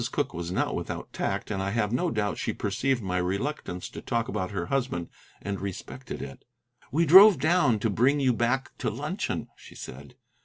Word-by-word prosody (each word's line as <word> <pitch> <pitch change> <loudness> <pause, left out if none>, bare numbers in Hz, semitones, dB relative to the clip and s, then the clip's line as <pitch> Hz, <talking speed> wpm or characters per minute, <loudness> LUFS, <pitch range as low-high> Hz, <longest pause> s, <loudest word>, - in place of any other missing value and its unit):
Cooke 140 -7 -1
was 85 0 -4
not - - 0
without - - -5
tact, - - -2
and 95 -2 -1
I 95 - -1
have 105 0 0
no 170 +8 +1
doubt 105 -6 -1
she - - -1
perceived 135 -4 -1
my 90 -1 -1
reluctance 95 +1 -2
to - - -8
talk 115 -2 -1
about 95 -7 -2
her 95 -4 -3
husband 125 -9 -1 0.3
and 100 -1 -3
respected 100 +6 -6
it. 70 - -9 0.5
"We 165 +5 +3
drove 190 +5 +9
down 155 -4 +3
to 115 - +1
bring 130 +8 +3
you 130 -3 +3
back 120 +3 0
to - - 0
luncheon," - - -3
she - - -15
said. 65 +2 -10
115 Hz, 190 wpm, -27 LUFS, 95-135 Hz, 0.5 s, drove